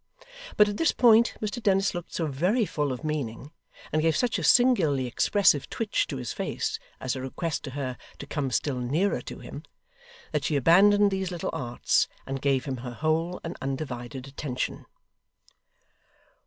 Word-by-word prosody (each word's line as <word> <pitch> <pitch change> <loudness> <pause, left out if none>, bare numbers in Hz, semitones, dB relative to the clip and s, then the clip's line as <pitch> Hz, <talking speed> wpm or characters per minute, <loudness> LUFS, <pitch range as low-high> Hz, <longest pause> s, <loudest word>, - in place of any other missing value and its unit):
But 210 - +7
at 205 0 -3
this 330 - +3
point, 235 -1 +5
Mr 215 +3 -3
Dennis 195 -2 +2
looked 175 -1 -6
so 165 - -2
very 180 - +1
full 150 -6 -1
of 130 +4 -5
meaning, 145 -3 -4 0.4
and 155 - +1
gave 160 -1 +2
such 245 -1 +1
a - - -4
singularly 180 - +4
expressive 145 - +2
twitch 225 -2 -1
to 140 - -4
his 125 -3 -4
face - - -3 0.2
as 130 0 -2
a 130 - -5
request 145 +4 -3
to - - -5
her 130 -3 -3 0.2
to - - -8
come 145 -2 -2
still 130 0 -1
nearer 150 +11 0
to - - -8
him, - - -9 0.7
that 150 -2 -1
she 155 - 0
abandoned 200 +8 +5
these 190 -1 -2
little 175 -2 -3
arts, 125 -6 +1 0.2
and 135 0 -4
gave 135 -1 +1
him 135 -2 -3
her 120 0 -7
whole 165 +4 0
and 165 +2 -5
undivided 130 -2 -5
attention. 135 -2 -4
155 Hz, 170 wpm, -27 LUFS, 135-195 Hz, 0.7 s, But